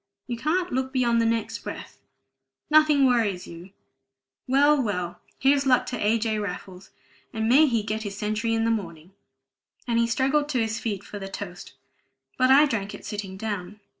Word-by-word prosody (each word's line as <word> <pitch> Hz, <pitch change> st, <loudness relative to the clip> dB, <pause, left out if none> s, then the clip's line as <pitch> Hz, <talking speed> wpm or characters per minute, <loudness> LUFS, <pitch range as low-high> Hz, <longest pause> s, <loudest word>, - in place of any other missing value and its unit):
You 240 Hz, -, -4 dB
can't 340 Hz, +9 st, -1 dB
look 260 Hz, +1 st, -1 dB
beyond 240 Hz, -3 st, +2 dB
the 230 Hz, -, +2 dB
next 230 Hz, 0 st, -1 dB
breath. -, -, -9 dB, 0.7 s
Nothing 305 Hz, -2 st, +5 dB
else -, -, +6 dB
worries 220 Hz, -7 st, +1 dB
you. 170 Hz, +2 st, -11 dB, 0.8 s
Well, 285 Hz, +2 st, +4 dB
well, 180 Hz, -6 st, -3 dB, 0.2 s
here's 275 Hz, +1 st, +2 dB
luck 255 Hz, -1 st, +4 dB
to 245 Hz, -, -5 dB
A. 215 Hz, +2 st, +3 dB
J. 220 Hz, -1 st, -1 dB
Raffles, 190 Hz, -1 st, -7 dB, 0.4 s
and 220 Hz, -1 st, -2 dB
may 285 Hz, +6 st, +6 dB
he 230 Hz, -5 st, 0 dB
get 215 Hz, +1 st, -3 dB
his 200 Hz, -2 st, -6 dB
century 215 Hz, +2 st, -1 dB
in 225 Hz, 0 st, +1 dB
the 230 Hz, -, +2 dB
morning!" 170 Hz, -5 st, -5 dB, 0.8 s
And 235 Hz, -1 st, +1 dB
he 235 Hz, -, +2 dB
struggled 270 Hz, +5 st, +1 dB
to 260 Hz, -4 st, 0 dB
his 220 Hz, -1 st, -1 dB
feet 205 Hz, -4 st, -3 dB
for 205 Hz, -, -8 dB
the 195 Hz, -, -6 dB
toast; 185 Hz, -2 st, -8 dB, 0.6 s
but 255 Hz, 0 st, +2 dB
I 280 Hz, +3 st, +7 dB
drank 210 Hz, -8 st, -3 dB
it -, -, -12 dB
sitting 205 Hz, -3 st, -6 dB
down. 205 Hz, -1 st, -5 dB
225 Hz, 185 wpm, -25 LUFS, 205-260 Hz, 0.8 s, I